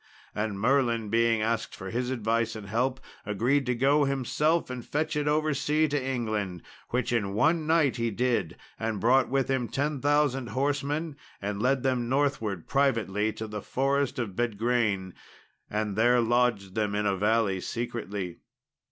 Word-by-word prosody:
And 105 -2 -2
Merlin 120 -2 +2
being 115 0 +2
asked 115 0 -1
for 95 0 -7
his 125 +2 -1
advice 115 -2 0
and 110 -2 -7
help, 125 +6 0 0.2
agreed 125 +7 +1
to 125 - +1
go 140 +4 +3
himself 140 +4 0
and 125 -2 -5
fetch 155 +4 -2
it 150 0 0
over 155 0 +2
sea 150 +3 +1
to 145 -2 -1
England, 110 -9 -2 0.3
which 125 0 -1
in 100 -4 0
one 160 +7 +2
night 160 -5 +3
he 115 0 0
did; 110 -6 0 0.2
and 110 -2 -2
brought 125 +5 +4
with 135 0 +1
him 130 -3 0
10,000 145 -2 +1
horsemen 145 +4 -1 0.2
and 100 0 -3
led 130 +1 +2
them 125 -3 0
northward 130 - 0
privately 110 -6 +1
to 110 - -6
the 105 -1 -5
forest 140 +3 0
of 110 -7 -3
Bedgraine, 110 -4 0 0.6
and 105 -1 -2
there 120 +3 +4
lodged 115 -5 +1
them 105 -1 -1
in 105 0 0
a 100 -1 +2
valley 105 -1 +1
secretly. 105 -6 -4
120 Hz, 160 wpm, -28 LUFS, 105-135 Hz, 0.6 s, brought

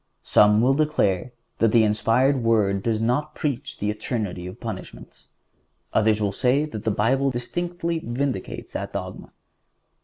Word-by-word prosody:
Some 105 +1 +5
will 130 +3 +4
declare 130 -9 +1 0.3
that 115 -1 +3
the 115 -1 +5
inspired 120 +5 +2
Word 105 -4 +2
does 110 +1 0
not 135 +7 0
preach 140 -2 -3
the 105 +1 -1
eternity 105 -5 -4
of 90 - -9
punishments. - - -8 0.7
Others 110 0 +3
will 105 -2 0
say 130 +7 +2
that 110 -9 -7
the - - +2
Bible 130 +7 +2
distinctly 170 +7 -3
vindicates 125 -3 -3
that - - -5
dogma. - - -6
115 Hz, 145 wpm, -24 LUFS, 105-140 Hz, 0.7 s, Some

